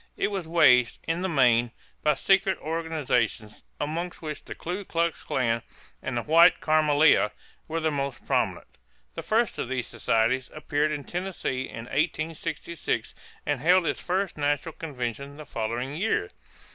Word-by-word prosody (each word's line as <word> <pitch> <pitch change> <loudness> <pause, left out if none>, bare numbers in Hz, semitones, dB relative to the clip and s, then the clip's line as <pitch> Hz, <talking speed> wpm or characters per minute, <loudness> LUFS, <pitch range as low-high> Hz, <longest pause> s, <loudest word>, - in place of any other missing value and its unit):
It - - +1
was 190 -5 -3
waged, 125 -8 +5
in 165 +2 -1
the 190 - -1
main, 120 -6 +4 0.3
by 150 -1 +3
secret 195 +4 +3
organizations, 150 -9 -1 0.2
among 165 +4 -2
which 155 -2 -7
the - - -8
Ku 180 +4 -4
Klux 170 -2 -1
Klan 115 -3 0 0.4
and 125 -2 -3
the 120 - -1
White 165 +2 +6
Camelia 155 -6 +4 0.4
were 165 +1 -2
the 160 -1 0
most 140 -3 -3
prominent. - - 0 0.5
The - - -5
first 225 0 +1
of - - -3
these 130 -2 -1
societies 120 +4 +1
appeared 150 0 0
in 145 -2 -3
Tennessee 175 -8 -3
in 115 +1 -7
1866 160 +2 -2 0.3
and 145 -3 0
held 180 +3 +5
its - - -1
first 185 -2 -2
national 145 +2 0
convention 140 -2 -5
the 155 - -9
following 120 +5 -3
year. 180 - 0
150 Hz, 150 wpm, -27 LUFS, 130-165 Hz, 0.5 s, White